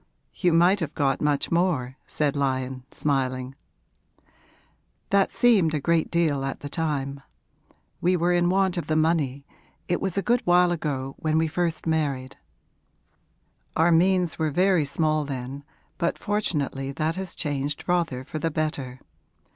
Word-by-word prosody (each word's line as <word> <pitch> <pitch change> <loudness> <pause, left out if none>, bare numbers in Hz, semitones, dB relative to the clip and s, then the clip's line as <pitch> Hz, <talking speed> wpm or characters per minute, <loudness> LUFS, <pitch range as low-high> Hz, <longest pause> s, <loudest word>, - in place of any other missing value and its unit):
'You 180 - +1
might 175 +4 +4
have 165 - -4
got 135 -2 +1
much 145 -1 +1
more,' 165 -8 +1
said 150 -2 -1
Lyon, 130 -2 -1
smiling. 130 -3 -1 1.6
'That 200 -1 +4
seemed 195 -10 +3
a - - 0
great 165 +2 +1
deal 155 -5 +1
at 135 0 -4
the 145 - -6
time. 140 -4 -2 0.8
We 180 +1 +3
were 175 +1 +2
in 175 0 +3
want 190 -1 +2
of 170 - -3
the 155 - 0
money 155 -4 +1 0.4
it 175 - 0
was 190 -1 -2
a 195 - +1
good 240 +1 +2
while 175 0 +4
ago, 140 -5 -3
when 155 0 +1
we 160 0 +2
first 165 +1 -2
married. 145 -5 -1 1.4
Our 165 +2 +4
means 180 0 +3
were 160 -1 +1
very 180 0 +3
small 155 +2 0
then, 135 0 -6 0.4
but 170 - 0
fortunately 150 -10 -1
that 155 +3 -1
has 190 -1 -5
changed 145 -1 -2
rather 165 -8 0
for 155 - -6
the 165 - 0
better. 145 -5 -3
155 Hz, 150 wpm, -25 LUFS, 140-175 Hz, 1.6 s, might